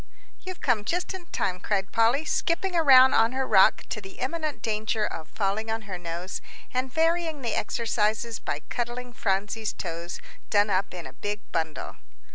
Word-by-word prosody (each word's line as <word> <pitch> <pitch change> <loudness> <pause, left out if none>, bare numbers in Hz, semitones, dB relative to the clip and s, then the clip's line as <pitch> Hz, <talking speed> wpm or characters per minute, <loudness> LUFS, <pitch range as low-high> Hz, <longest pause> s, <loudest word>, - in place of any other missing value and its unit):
"You've 370 -1 -8
come 235 -5 +2
just 355 - -1
in 365 -2 -8
time," 185 - -1
cried 195 0 -1
Polly, 235 +7 +3
skipping 350 +4 0
around 265 -5 +8
on 225 +2 +4
her 265 0 0
rock 190 -6 +5
to 215 - -3
the 195 -1 -10
imminent 310 +3 -3
danger 215 0 0
of 160 -5 -5
falling 210 +2 -1
on 225 0 -2
her 190 -4 -6
nose, 175 +2 -5 0.3
and 255 +1 -1
varying 325 -1 +1
the 230 -3 -1
exercises 225 0 0
by 145 - -3
cuddling 245 +1 -4
Phronsie's 210 +1 -1
toes, 170 0 -5 0.3
done 205 0 +3
up 190 +1 +1
in 175 - -7
a 130 - -9
big 205 +6 -4
bundle. 160 -2 -3
220 Hz, 170 wpm, -27 LUFS, 195-260 Hz, 0.3 s, around